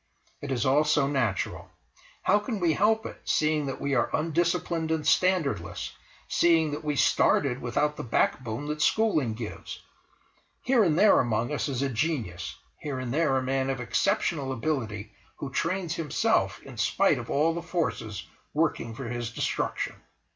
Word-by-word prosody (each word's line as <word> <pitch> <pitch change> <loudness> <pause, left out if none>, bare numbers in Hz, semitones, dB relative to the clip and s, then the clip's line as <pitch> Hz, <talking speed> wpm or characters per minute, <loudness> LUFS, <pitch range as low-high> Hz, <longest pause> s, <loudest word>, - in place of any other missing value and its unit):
It 145 - -5
is 130 0 0
all 140 +3 +4
so 150 -2 +3
natural. 130 -9 -1 0.5
How 205 +2 +4
can 210 0 -4
we 170 -3 +2
help 220 +4 +2
it, - - -8
seeing 155 -1 +1
that 135 - -4
we 140 0 -1
are 120 -3 +2
undisciplined 165 +1 0
and 160 -1 0
standardless, 155 - +1 0.4
seeing 165 -3 +3
that 145 - -5
we 150 -1 -1
started 130 -1 +3
without 150 +5 0
the - - -4
backbone 120 +2 0
that 150 0 -3
schooling 155 - +2
gives? 110 -2 -7 0.8
Here 250 -3 +4
and 165 -5 +2
there 210 +2 +6
among 120 +3 0
us 150 - -1
is 135 -1 -1
a 140 - 0
genius, 120 - -2 0.2
here 145 -3 -4
and 130 -1 -3
there 150 -3 +2
a 130 - 0
man 135 +1 0
of 135 -1 -2
exceptional 135 - 0
stability 115 -6 -3 0.2
who 140 - -6
trains 170 +3 -1
himself 165 -4 0
in - - -11
spite - - +2
of - - -8
all 155 +4 +2
the 170 - -4
forces 160 - -3 0.3
working 145 -7 0
for 130 0 -6
his 120 -1 -3
destruction. 115 - -2
145 Hz, 165 wpm, -27 LUFS, 125-165 Hz, 0.8 s, there